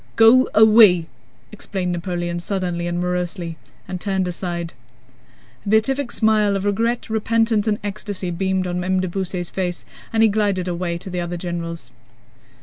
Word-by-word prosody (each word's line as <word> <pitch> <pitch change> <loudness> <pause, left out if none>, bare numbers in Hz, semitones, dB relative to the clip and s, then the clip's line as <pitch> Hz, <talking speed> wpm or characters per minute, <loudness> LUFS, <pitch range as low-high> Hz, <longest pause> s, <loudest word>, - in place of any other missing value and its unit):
"Go 230 +3 +6
away..." 215 -5 +7 0.5
exclaimed 190 -3 -4
Napoleon 175 -1 -3
suddenly 175 -2 -2
and 175 0 -2
morosely, 180 -1 -2 0.3
and 180 -1 -5
turned 190 -3 -1
aside. 170 -1 -4 0.9
A - - -5
beatific 240 +5 +2
smile 215 -2 +2
of 195 0 -2
regret, 230 +4 0
repentance, 225 0 +1
and 210 -1 +2
ecstasy 205 -3 -4
beamed 190 +1 -1
on 180 0 -2
M. 185 +1 +1
de 185 - -1
Beausset's 180 -1 -3
face 180 -2 -3 0.3
and 225 0 +3
he - - +7
glided 200 -3 0
away 175 -1 -2
to 185 +2 -8
the 180 - -3
other 175 0 -4
generals. 170 -1 -5
185 Hz, 150 wpm, -21 LUFS, 175-215 Hz, 0.9 s, away